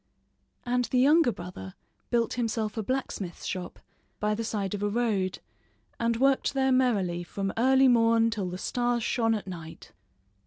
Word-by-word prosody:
And 245 0 +1
the 255 - -1
younger 290 +2 +5
brother 175 - -9 0.3
built 235 -2 +1
himself 225 -3 -2
a 220 - -1
blacksmith's 210 -7 -4
shop 180 -2 -5 0.4
by 210 0 +1
the 225 +2 -3
side 205 -3 -2
of 205 - -4
a 205 - 0
road 205 -5 0 0.6
and 230 0 +1
worked 270 +2 +2
there 265 0 +2
merrily 200 -9 +1
from 195 +2 -4
early 265 +3 +4
morn 230 -1 +4
till 200 -5 -2
the 180 - -5
stars 240 +3 -1
shone 225 -1 +1
at 210 - -5
night. 165 -4 -9
225 Hz, 160 wpm, -28 LUFS, 195-245 Hz, 0.6 s, younger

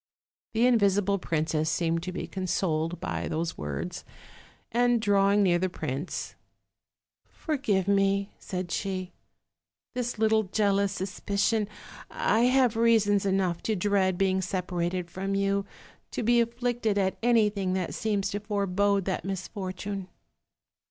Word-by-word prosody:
The 230 +2 +3
invisible 200 -4 +3
princess 155 -2 0
seemed 165 0 0
to 185 - -4
be 185 - -4
consoled 175 -3 -1
by 85 -1 -3
those 165 +1 -2
words, 75 -2 -5 0.7
and 245 0 +3
drawing 200 -1 +3
near 175 -2 +3
the 185 +1 0
prince: 145 -1 -4 0.9
"Forgive 260 - -1
me 200 0 +2
r - - -34
" - - -38
said 180 -2 -5
she, 185 -2 -3 0.8
"this 245 -2 -2
little 220 0 +3
jealous 200 -1 +1
suspicion; 200 +3 -1 0.4
I 225 +3 +2
have 255 -2 +3
reasons 215 -3 +3
enough 190 -3 +1
to 220 - -1
dread 190 -1 +1
being 190 0 +2
separated 180 -1 -2
from 195 +2 -2
you, 200 0 0 0.4
to - - -3
be 240 +1 +4
afflicted 235 -2 -1
at 190 -1 +1
any 230 -3 +4
thing 195 -3 -2
that 185 -2 -2
seems 205 -3 -1
to 205 - -2
forebode 200 -1 +1
that 190 - -2
misfortune." 190 0 -5
195 Hz, 135 wpm, -28 LUFS, 185-215 Hz, 0.9 s, be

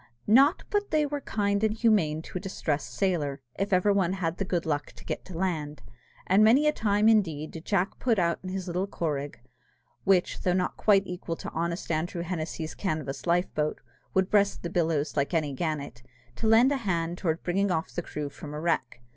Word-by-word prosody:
Not 270 - +5
but 410 0 0
they 305 -1 +2
were 290 0 -3
kind 200 -3 0
and 215 0 +2
humane 200 -10 +2
to 180 - -5
a - - -12
distressed 160 -6 -2
sailor, 160 -8 0 0.2
if 195 +1 -1
ever 190 +2 +4
one 190 -2 +1
had 175 -3 -2
the 195 - -1
good 175 -2 -1
luck 145 -2 -1
to - - -15
get - - -4
to 180 -3 -8
land; 155 -6 -2 0.4
and 195 +3 +5
many 250 +7 +5
a 300 - +5
time 210 -4 +2
indeed 165 -9 +2
did 165 0 -9
Jack 195 -2 0
put 235 -4 +2
out 170 -2 +1
in 185 - -6
his 190 0 -3
little 180 +2 -2
corragh 145 -7 -3 0.7
(which, 190 -2 +2
though 180 - +1
not 180 0 0
quite 200 -2 +4
equal 180 -2 -4
to - - -7
honest 170 +1 -2
Andrew 170 +2 -1
Hennessy's 160 -2 -4
canvas 155 -6 -3
life 175 +2 +1
boat, 150 0 -1 0.4
would 190 0 +2
breast 200 -1 +2
the 170 - -4
billows 160 -5 0
like 140 +4 0
any 150 -3 0
gannet), 140 -5 -3 0.4
to 225 - -1
lend 230 +5 +6
a 285 - +1
hand 175 -7 -2
towards 165 -2 -1
bringing 195 +3 +1
off 165 -3 -1
the 175 - -2
crew 150 -3 -5
from 150 +1 -9
a - - -4
wreck. 155 -7 -1
180 Hz, 205 wpm, -28 LUFS, 160-200 Hz, 0.7 s, lend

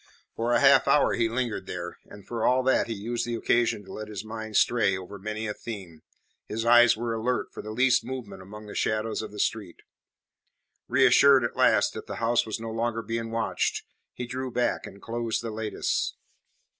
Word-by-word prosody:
For 115 +1 -1
a - - +4
half - - +6
hour - - +4
he 115 -1 +1
lingered 115 -5 -2
there, 85 -1 -6
and 100 - -14
for 115 -2 -4
all 130 +2 +3
that 130 -1 +2
he 115 - -3
used 115 +4 -3
the 120 0 -3
occasion 115 -2 +1
to - - -10
let 110 0 -6
his 105 0 -7
mind 110 -1 -4
stray 105 -5 +3
over 95 +2 -9
many 110 +2 -4
a 105 - -2
theme, 95 -10 -8 0.5
his 115 +2 -3
eyes 120 -1 +6
were 115 0 -2
alert 120 +3 -1
for - - -7
the 110 - -8
least 125 +3 +3
movement 115 -8 -7
among 105 +3 -11
the 105 - -9
shadows 110 +1 -1
of 110 -2 -7
the 105 - -11
street. 105 -4 -2 1.0
Reassured 140 -2 +6
at 120 - -2
last - - +3
that - - -8
the - - -5
house 115 0 +1
was 110 - -3
no 115 0 -5
longer 115 0 -2
being 115 +1 -3
watched, 115 0 -1 0.3
he 125 - -6
drew 130 +2 -4
back, 125 0 -1
and 100 - -12
closed 115 -1 -2
the 115 - -4
lattice. 110 0 -2
115 Hz, 200 wpm, -27 LUFS, 105-120 Hz, 1.0 s, half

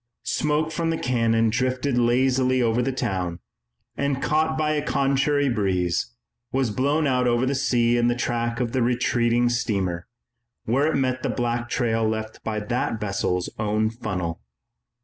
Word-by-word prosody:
Smoke 150 +1 0
from 165 +1 -1
the 165 - 0
cannon 115 -3 +1
drifted 130 +3 0
lazily 130 +2 +2
over 115 0 +2
the 135 - 0
town, 90 -8 -2 0.6
and, 140 -1 -1
caught 155 +2 +1
by 155 -1 +1
a 150 -1 0
contrary 140 +1 +1
breeze, 95 -2 0 0.4
was 130 -4 0
blown 140 +7 +1
out 125 -2 +2
over 120 +1 +2
the 135 - 0
sea 120 -3 +2
in 120 0 +2
the 120 - +2
track 120 0 -1
of 120 -2 -1
the 130 - 0
retreating 120 0 +2
steamer, 95 -7 -1 0.6
where 140 +7 +2
it - - -1
met 130 -1 0
the - - -2
black 120 -1 -2
trail 115 -2 0
left 110 0 -3
by 110 -1 -2
that 115 +1 -2
vessel's 95 -3 -1
own 110 +1 +1
funnel. 95 -8 -4
120 Hz, 160 wpm, -24 LUFS, 110-135 Hz, 0.6 s, lazily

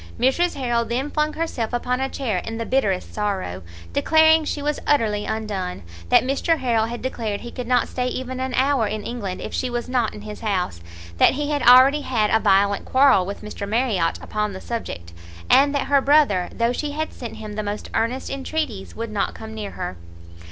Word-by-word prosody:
Mrs 340 +8 +2
Harrel 240 -4 0
then 250 +5 -2
flung 305 0 0
herself 260 -9 -3
upon 250 +1 -1
a 270 - -1
chair 230 -11 -2
in 225 +5 -6
the 230 - -3
bitterest 205 -9 0
sorrow, 195 - -2 0.3
declaring 315 - +5
she 295 - -2
was 295 0 -1
utterly 215 -7 +2
undone; 200 - -3 0.3
that - - +6
Mr 280 +5 +1
Harrel 235 -5 +1
had 240 +1 -6
declared 225 -5 -3
he 240 - -8
could 250 -2 -6
not 245 -1 +2
stay 250 -1 -2
even 255 0 -4
an 260 -1 -2
hour 265 -4 +2
in 215 0 -4
England 205 -6 -5
if - - -6
she 255 - -1
was 240 -1 -3
not 250 -3 0
in 210 - -9
his 210 -1 -8
house; 185 - -2 0.4
that - - +6
he 295 +1 -2
had 290 -1 0
already 260 +4 +7
had 225 -6 0
a 220 - +4
violent 200 0 +3
quarrel 260 -9 +4
with 200 - -6
Mr 200 -1 -6
Marriot 215 -7 +1
upon 210 -1 -2
the 190 - -7
subject; 85 - -6 0.4
and 285 +1 +5
that 280 - 0
her 280 -1 +3
brother, 275 -11 +3
though 235 +1 0
she 290 +3 -3
had 315 +1 -3
sent 235 -3 -7
him 215 -1 -7
the 215 - -2
most 205 0 -4
earnest 245 +4 -1
entreaties, 275 -6 -4
would 230 -1 -5
not 205 -2 -1
come 220 0 -8
near 215 -2 -5
her. 90 - -6
235 Hz, 205 wpm, -22 LUFS, 210-270 Hz, 0.4 s, already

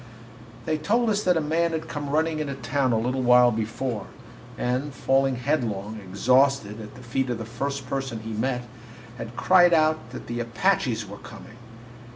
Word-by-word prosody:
They 155 -1 0
told 225 +8 +2
us 205 0 +1
that 180 -4 +2
a - - +1
man 165 +2 +1
had 160 - -3
come 145 -2 -5
running 155 +2 +1
into 140 -3 -3
town 130 0 0
a 115 - +2
little 125 +4 -1
while 125 0 +6
before, 115 0 -3 0.5
and, 130 +4 -1
falling 135 0 +2
headlong, 110 -6 -2
exhausted, 115 +2 +2
at 105 - -10
the 125 - -12
feet 125 +2 -1
of 120 - -1
the 115 - -6
first 135 +4 -4
person 135 -4 -3
he 110 0 -6
met, 125 +3 -1 0.6
had 115 +1 -7
cried 175 -2 +5
out 155 -6 +1
that 125 - -8
the 120 0 -4
Apaches 120 - 0
were 100 +1 -10
coming. 110 - -12
130 Hz, 180 wpm, -25 LUFS, 115-150 Hz, 0.6 s, while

